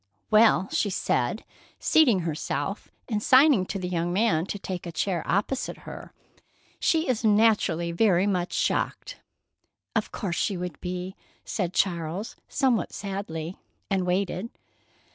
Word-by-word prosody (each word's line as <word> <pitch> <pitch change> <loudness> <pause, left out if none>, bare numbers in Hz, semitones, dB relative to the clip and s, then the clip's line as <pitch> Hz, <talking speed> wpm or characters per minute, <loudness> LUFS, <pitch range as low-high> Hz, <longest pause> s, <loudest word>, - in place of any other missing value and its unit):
"Well," 215 -3 +5
she 205 - +1
said, 190 - -1 0.3
seating 245 - +4
herself 155 +2 -3 0.2
and 215 -3 -1
signing 260 -6 +5
to 200 - -3
the 185 -1 -3
young 175 -1 -1
man 190 -4 +2
to 205 - -3
take 185 -3 -5
a - - -5
chair 175 +1 -1
opposite 230 +6 -1
her, - - -9 0.7
"she 325 0 +2
is 245 -3 0
naturally 205 -6 +3
very 185 0 +3
much 185 -3 0
shocked." - - -1 0.8
"Of - - 0
course 185 -5 -3
she 200 -4 0
would 180 -3 -6
be," 180 +1 -4 0.3
said 185 -3 -2
Charles, 175 +2 -1
somewhat 260 -5 +1
sadly, 190 -4 -5 0.3
and 190 -2 +1
waited. 185 +3 -1
190 Hz, 135 wpm, -26 LUFS, 175-215 Hz, 0.8 s, Well